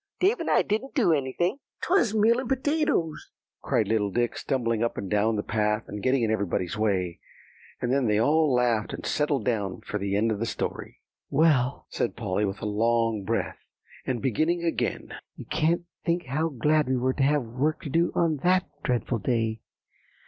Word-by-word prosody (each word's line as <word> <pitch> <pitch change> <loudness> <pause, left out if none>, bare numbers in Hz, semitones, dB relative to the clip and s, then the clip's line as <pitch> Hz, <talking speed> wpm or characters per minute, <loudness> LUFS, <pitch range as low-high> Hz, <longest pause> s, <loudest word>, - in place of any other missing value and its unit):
"Dave 400 +6 +3
and - - -3
I - - +4
didn't 220 +8 -2
do 210 - +4
anything." 155 - -1 0.2
"'Twas 340 - +2
meal 225 +3 +4
and 260 -2 -5
potatoes," 275 - 0 0.3
cried - - +1
little 110 -2 +1
Dick, 120 +4 0
stumbling 115 -4 -1
up 115 - -1
and 95 - -5
down 105 +2 +2
the 105 - -2
path, 105 0 0
and 105 0 -6
getting 130 +1 +2
in 110 - +1
everybody's 95 -3 -1
way. 95 -5 0 0.6
And 125 +1 0
then 135 -3 +2
they 105 -1 +2
all 150 +6 +3
laughed, 120 -5 +1
and - - -9
settled 145 -5 0
down 105 -6 -1
for 105 - -4
the 100 0 -1
end 110 +2 +2
of 105 - -2
the 115 - -1
story. - - -5 0.3
"Well," 140 -4 +2
said 120 - -1
Polly 105 -2 -1
with 100 +3 -5
a - - -1
long 115 0 +1
breath, 115 +4 -2 0.4
and 125 -2 -3
beginning 155 +8 +1
again, 165 - -2 0.2
"you - - -9
can't 170 +3 +1 0.2
think 170 +1 0
how 155 +6 -1
glad 150 +1 +1
we 130 - +2
were 130 +1 +1
to 135 - -3
have 145 0 +3
work 130 +7 -1
to 150 - -5
do 170 +3 +2
on 165 -3 +2
that 180 +5 +2
dreadful 120 -2 -1
day. 110 0 -1
125 Hz, 190 wpm, -26 LUFS, 110-160 Hz, 0.6 s, I